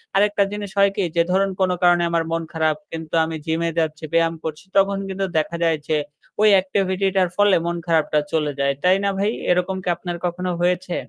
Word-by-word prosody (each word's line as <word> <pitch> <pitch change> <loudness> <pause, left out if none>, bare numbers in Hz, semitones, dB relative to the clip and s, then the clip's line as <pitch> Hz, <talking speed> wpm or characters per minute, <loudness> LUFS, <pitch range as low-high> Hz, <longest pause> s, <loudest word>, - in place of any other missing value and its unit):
আরেকটা 205 0 +3
জিনিস 205 -1 -5
হয় 200 0 +5
কি 200 - 0
যে, 170 - +4
ধরুন 195 +1 +2
কোনো 185 -1 +2
কারণে 175 -1 +5
আমার 170 -1 +1
মন 165 0 -1
খারাপ 160 -1 +1 0.2
কিন্তু 160 -1 -7
আমি 160 0 -5
gym-এ 165 +1 0
যাচ্ছি, 155 -1 -2
ব্যায়াম 165 0 +3
করছি 155 +1 -6
তখন 195 0 +3
কিন্তু 195 0 -2
দেখা 155 +2 -1
যায় 165 -1 +2
যে, 155 - +1 0.4
ওই 215 - +6
activity-টার 190 -1 0
ফলে 205 -1 +5
মন 170 0 -2
খারাপটা 160 -2 +2
চলে 150 -2 0
যায়। 140 0 +2
তাই 185 +1 +5
না 200 - +2
ভাই? 205 +2 +1 0.2
এরকম 180 +1 +1
কি - - -10
আপনার 175 -1 -5
কখনো 180 +1 -2
হয়েছে? 180 0 0
180 Hz, 200 wpm, -21 LUFS, 165-195 Hz, 0.4 s, ওই